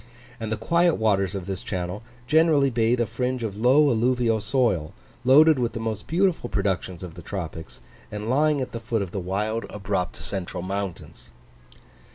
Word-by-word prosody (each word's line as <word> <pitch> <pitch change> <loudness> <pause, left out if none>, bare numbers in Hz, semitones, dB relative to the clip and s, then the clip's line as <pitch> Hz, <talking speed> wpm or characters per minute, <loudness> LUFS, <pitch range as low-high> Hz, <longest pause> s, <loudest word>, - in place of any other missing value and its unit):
And 110 -1 -4
the 110 - 0
quiet 170 +8 +2
waters 100 -3 +1
of 95 -3 -4
this 95 -1 -4
channel 90 +1 -4 0.2
generally 150 -1 +4
bathe 120 +1 +2
a 120 - +2
fringe 125 +2 -2
of 105 -3 -3
low 135 +6 +5
alluvial 120 -1 +1
soil, 110 - 0 0.3
loaded 145 +3 +6
with 120 -2 -1
the - - -4
most 110 -2 -4
beautiful 170 -5 +1
productions 95 -2 -2
of 90 -3 -7
the 85 - -10
tropics, 80 -3 -7 0.3
and 105 +1 -5
lying 145 +3 +2
at 125 -1 -4
the 115 - -5
foot 115 -2 -1
of 90 - -7
the 100 - -3
wild, 105 +5 -2
abrupt, 95 -3 -2
central 90 -3 -5
mountains. 95 -1 -5
110 Hz, 175 wpm, -25 LUFS, 95-130 Hz, 0.3 s, loaded